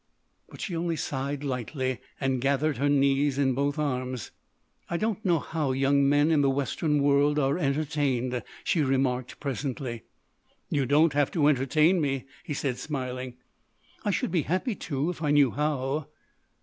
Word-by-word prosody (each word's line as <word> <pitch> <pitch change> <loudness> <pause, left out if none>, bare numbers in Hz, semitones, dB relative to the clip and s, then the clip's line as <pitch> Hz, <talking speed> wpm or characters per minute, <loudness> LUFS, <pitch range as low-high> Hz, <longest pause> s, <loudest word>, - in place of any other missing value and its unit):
But - - -11
she 180 - -3
only 165 0 -1
sighed, 140 -1 -3
lightly, 130 -1 -2 0.2
and 135 -2 0
gathered 140 +3 +1
her 145 +1 +1
knees 140 0 +2
in 135 -2 +2
both 140 +3 0
arms. 130 -5 -2 0.6
"I 170 - -1
don't 215 +1 -1
know 175 -3 +3
how 150 -3 -2
young 140 +1 +3
men 145 +2 +4
in 155 -3 +4
the 140 - +3
Western 140 +2 0
world 145 +1 +3
are 140 +3 +1
entertained," 135 -5 0 0.2
she 165 - +1
remarked 130 -2 0
presently. 130 -4 -4 0.7
"You 140 -3 +1
don't 150 +3 +4
have 145 -1 +2
to 155 -4 +2
entertain 150 +5 +3
me," 135 -3 -1 0.2
he 150 -5 -4
said, 135 -3 -2
smiling. 130 -3 -4 0.7
"I - - 0
should 190 - 0
be 170 -3 +2
happy 185 - -1
to, 150 -3 -2
if 170 - -10
I 150 - 0
knew 145 -3 +5
how." 145 -1 -1
140 Hz, 160 wpm, -27 LUFS, 135-150 Hz, 0.7 s, knew